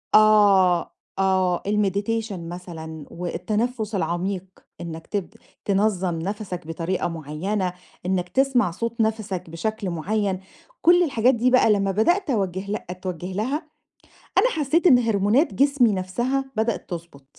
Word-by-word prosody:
آه، 200 -5 +5 0.3
آه 185 -2 +2
الMeditation 210 +2 0
مثلًا، 165 -3 -7
والتنفُّس 210 +6 -2
العميق، 185 +1 -1 0.4
إنك 165 -1 -7
ت 200 -4 -3 0.4
تنظّم 190 -4 +1
نَفَسَكْ 185 -2 -5
بطريقة 165 +3 -2
معيّنة، 175 +4 -3 0.3
إنك 180 -1 -1
تسمع 260 -7 +2
صوت 230 +5 -3
نَفَسَكْ 215 -6 -2
بشكل 215 +4 -3
معيّن، 190 +3 -1 0.4
كل 350 +1 +6
الحاجات 255 -4 +3
دي 250 +2 +2
بقى 255 -4 +5
لمّا 200 -1 +2
بدأت 345 - +2
أوجِّه 195 -3 -1
لها 210 - -3
اتْوجِّه 180 0 -5
لها، 235 +9 -1 0.8
أنا - - +5
حسيت 320 - +2
إن 250 -5 +7
هرمونات 225 - +2
جسمي 275 -5 +3
نفسها 240 +9 -1
بدأت 220 +1 -1
تِضبُط. 170 -6 -8
200 Hz, 125 wpm, -23 LUFS, 180-225 Hz, 0.8 s, إن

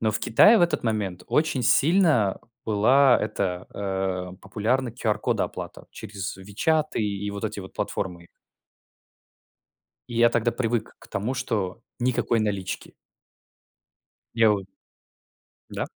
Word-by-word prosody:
но 110 -1 +2
в - - -1
Китае 210 - +6
в - - +2
этот 170 -3 +2
момент 100 -5 -2
очень 150 -5 +1
сильно 140 - +3 0.3
была 125 +5 +5
эта, 95 -4 -2 0.7
э, 95 - -12
популярна 115 +6 -1
QR-код 110 -3 -1
оплата - - -5
через 100 -2 -6
"Вичаты" 150 +11 0
и 100 -1 -2
вот 100 +1 -5
эти 105 -2 -3
вот 95 - -10
платформы 85 -2 -4
их. - - -21 1.8
И 120 - -6
я 120 0 +6
тогда 115 0 +1
привык 115 -2 -2
к - - -16
тому, 105 +7 -2
что 110 -6 -2 0.2
никакой 120 -1 +1
налички. 100 -3 -3 1.4
Я 115 -2 +5
вот 100 -2 -2 1.0
Да. - - -3
110 Hz, 130 wpm, -25 LUFS, 100-125 Hz, 1.8 s, Китае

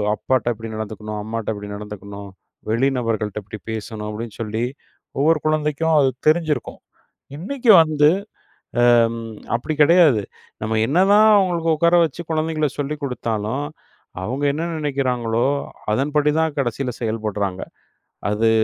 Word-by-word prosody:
அப்பாட்ட 130 -1 0
இப்படி 115 +1 -8
நடந்துக்கணும், 105 0 -5
அம்மாட்ட 110 0 -3
இப்படி 105 0 -8
நடந்துக்கணும், 100 -1 -8 0.4
வெளி 125 +4 +2
நபர்கள்ட்ட 110 -3 -2
இப்படி 105 +2 -9
பேசணும்." 110 -1 -5
அப்படீன்னு 110 0 -7
சொல்லி 110 +1 -2 0.6
ஒவ்வொரு 155 +2 +3
குழந்தைக்கும் 155 +1 +1
அது 135 -2 +4 0.2
தெரிஞ்சிருக்கும். 155 -2 -1 0.6
இன்னைக்கு 235 - +2
வந்து 150 -2 +3 0.8
அம் 115 -1 +3 0.4
அப்படி 140 +6 -2
கெடையாது. 155 - +6 0.4
நம்ம 110 0 -1
என்னதான் 200 +7 +5
அவங்களுக்கு 175 -4 +1
உட்கார 170 +2 +4
வச்சு 165 +1 -3
குழந்தைகளை 155 -1 0
சொல்லிக் 145 +1 -3
குடுத்தாலும், 120 0 -2 0.6
அவங்க 130 +7 -3
என்ன 160 +4 -3
நெனைக்கிறாங்களோ, 125 -6 0 0.5
அதன்படிதான் 150 +4 +1
கடைசியில 125 0 -1
செயல்படுறாங்க. 105 -4 -2 0.7
அது 110 +2 +2
130 Hz, 115 wpm, -21 LUFS, 110-155 Hz, 0.8 s, கெடையாது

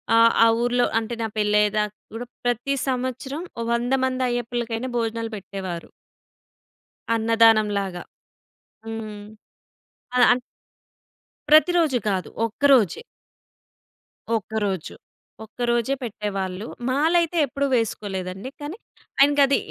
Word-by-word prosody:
ఆహ్, 230 0 +6
ఆ - - +6 0.2
ఊర్లో 245 0 +2
అంటే 230 +1 -5
నా 225 - 0
పెళ్లి 210 0 +2
అయ్యేదాకా 210 0 0 0.2
గూడా 240 +2 -6 0.2
ప్రతి 245 +3 0
సంవత్సరం 260 +4 -3 0.2
ఓ - - -1
100 240 +2 0
మంది 260 0 -1
అయ్యప్పలకైనా 240 0 -2
భోజనాలు 230 0 -2
పెట్టేవారు. 190 -3 -6 1.3
అన్నదానం 225 -1 +4
లాగా. 185 -3 -5 0.8
హ్మ్. 220 -2 -6 0.9
ఆ! - - 0 0.2
ఆన్ 245 - +1 1.1
ప్రతిరోజు 315 -2 +5
కాదు. 190 -3 -1 0.2
ఒక్క 230 +5 -8
రోజే. 235 - +4 1.4
ఒక్కరోజు. 205 -4 -3 0.5
ఒక్కరోజే 240 +3 -1
పెట్టేవాళ్ళు. 200 -3 -4 0.2
మాలైతే 330 +5 +2
ఎప్పుడూ 280 +2 -2
వేసుకోలేదండి. 195 -2 -3
కానీ 300 +8 -6 0.4
ఆయనకది 280 0 +5
230 Hz, 100 wpm, -23 LUFS, 210-255 Hz, 1.4 s, ఆహ్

